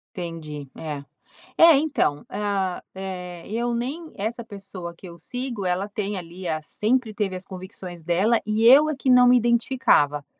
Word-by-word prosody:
Entendi, 155 -5 -6
é. 145 -3 -6 0.5
É, 330 -3 +8
então, 275 - 0
ah, 195 -3 -2
eh, 180 -2 -6
eu 235 +3 -1
nem 290 +8 -4
essa 225 +4 -3
pessoa 195 -4 -8
que 190 - -13
eu 170 -1 -12
sigo, 245 - -4
ela 185 +3 0
tem 205 -1 -3
ali 180 +1 -7
a 155 -1 -2
sempre 225 +6 0
teve 205 -3 -2
as 185 +1 -7
convicções 185 -2 -9
dela, 190 +8 +2
e 215 +2 0
eu 280 +6 +8
é 310 - -1
que 270 - -6
não 250 -1 +7
me 250 0 +7
identificava. 235 - +2
200 Hz, 165 wpm, -24 LUFS, 175-240 Hz, 0.5 s, É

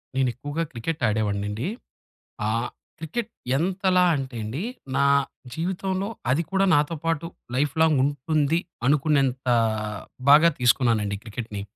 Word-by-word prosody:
నేను 130 -2 +2
ఎక్కువగా 145 +6 -3
క్రికెట్ 150 +7 -4
ఆడేవాడినండి. 105 - -1 0.8
ఆహ్, 115 +3 0 0.3
క్రికెట్ 205 +9 -4 0.3
ఎంతలా 185 +2 +2
అంటేనండి, 130 - -4 0.3
నా 140 - +3 0.5
జీవితంలో 190 +3 -2 0.2
అది 145 +6 +2
కూడా 195 0 +2
నాతో 150 +3 +1
పాటు 165 0 0 0.3
లైఫ్‌లాంగ్ 155 +1 +2
ఉంటుంది 145 +2 +1 0.3
అనుకున్నంత 140 -3 +2 0.9
బాగా 155 +4 +8
తీసుకున్నానండి 115 -5 +2
క్రికెట్‌ని. 110 -2 -6
145 Hz, 100 wpm, -25 LUFS, 120-165 Hz, 0.9 s, బాగా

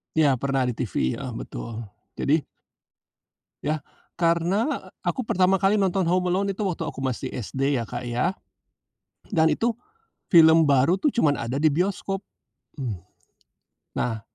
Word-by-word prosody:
Ya, 145 -5 +4
pernah 135 -1 0
di 125 - 0
TV, 95 - -1
heeh, - - -5
betul. 110 - -6 0.3
Jadi 150 +2 +1 1.2
Ya, 155 -1 0 0.4
karena 175 - +1
aku 255 - -2
pertama 185 -1 +3
kali 195 +2 +3
nonton 190 -1 +1
Home 180 +1 +1
Alone 195 +2 +1
itu 190 - -6
waktu 175 -5 -1
aku 135 - -6
masih 130 0 -3
SD 135 +4 -1
ya, - - -4
Kak, 120 +1 -5
ya. 120 +9 0 0.9
Dan 160 -6 +3
itu 230 +5 +1 0.6
film 160 -2 +7
baru 140 +5 +4
tuh 295 - +3
cuman 155 -13 +2
ada 120 +4 -2
di 155 +1 +4
bioskop. 195 +3 -1 0.5
Hmm. 120 - -4 1.0
Nah, 110 -3 -1
160 Hz, 140 wpm, -25 LUFS, 130-185 Hz, 1.2 s, film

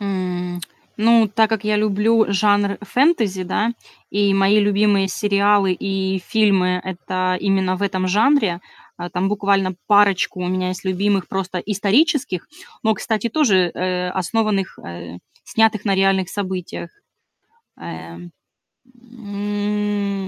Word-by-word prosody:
М, 180 -3 -3 0.4
ну 225 0 +4
так 220 +2 +2
как 220 -1 -2
я 210 0 +1
люблю 215 +2 +2
жанр 205 0 +2
фэнтези, 220 - +1
да, 215 +5 -1 0.4
и 200 -1 +2
мои 195 +2 +4
любимые 205 -1 +2
сериалы 200 0 +2
и 190 0 -2
фильмы- 190 -4 +2
это 185 0 -2
именно 190 -1 +1
в 200 - -6
этом 185 -2 -1
жанре. 210 -3 +2 0.4
А, 175 - -6
там 185 +2 -1
буквально 195 -2 +1
парочку 200 -3 +3
у - - -2
меня 185 0 -1
есть 185 +1 -6
любимых, 195 +1 0
просто 185 -1 -3
исторических, 210 - 0 0.4
но, 220 -1 +2
кстати, 220 0 -2
тоже, 205 - +2
э, 180 0 -2
основанных, 195 +1 -1
э, 85 0 -9 0.3
снятых 220 -3 +1
на 200 -2 +1
реальных 190 -1 +2
событиях. 190 -3 -5 0.9
Эм, 85 +1 -9 0.8
м, 205 -2 -3
195 Hz, 125 wpm, -20 LUFS, 185-210 Hz, 0.9 s, ну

